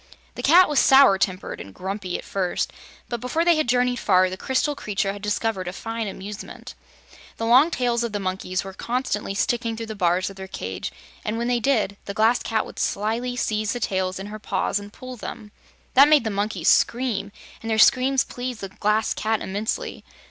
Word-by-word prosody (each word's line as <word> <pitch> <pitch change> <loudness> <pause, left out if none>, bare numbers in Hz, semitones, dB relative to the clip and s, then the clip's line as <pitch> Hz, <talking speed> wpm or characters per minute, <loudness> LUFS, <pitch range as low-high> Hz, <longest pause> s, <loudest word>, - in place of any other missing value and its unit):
The - - -6
Cat 355 +5 +6
was 295 -2 +2
sour 265 -8 +6
tempered 185 -1 -2
and 100 - -11
grumpy, 190 -1 -4
at - - -10
first, 185 -2 -2 0.3
but 240 -2 -4
before 320 +7 0
they 345 -1 +5
had 310 -6 0
journeyed 245 0 +2
far, 185 -3 +3
the - - -3
crystal 265 +8 0
creature 200 -4 -2
had 205 - -9
discovered 210 -2 -1
a 180 - -4
fine 225 +2 -4
amusement. 200 +2 -8 0.6
The 225 - -2
long 255 +7 +6
tails 240 -6 0
of 235 - -2
the 205 - -2
monkeys 185 -1 -2
were 195 0 -8
constantly 235 -3 -2
sticking 230 +1 0
through 225 - -4
the 220 -1 -7
bars 180 -1 +1
of 195 - -14
their 190 0 -7
cage, 95 - -5 0.3
and 215 +2 -2
when 235 +1 -1
they 245 -1 +2
did, 220 -6 +1
the 200 - -6
Glass 225 +3 +3
Cat 220 -2 -1
would - - -10
slyly 230 +5 -1
seize 215 -3 -1
the 245 - -4
tails 185 -3 -1
in 195 - -6
her 210 +1 -7
paws 200 0 -1
and 205 0 -10
pull 255 +3 -9
them. 215 -1 -8 0.4
That 275 +3 +8
made 305 -4 +5
the 220 - -2
monkeys 200 -4 -2
scream, 230 -5 +2 0.3
and 225 - -5
their 220 - +1
screams 260 +3 +5
pleased 245 -2 -6
the 195 - -5
Glass 210 +3 0
Cat 220 0 0
immensely. 205 +3 -3
215 Hz, 205 wpm, -24 LUFS, 195-245 Hz, 0.6 s, That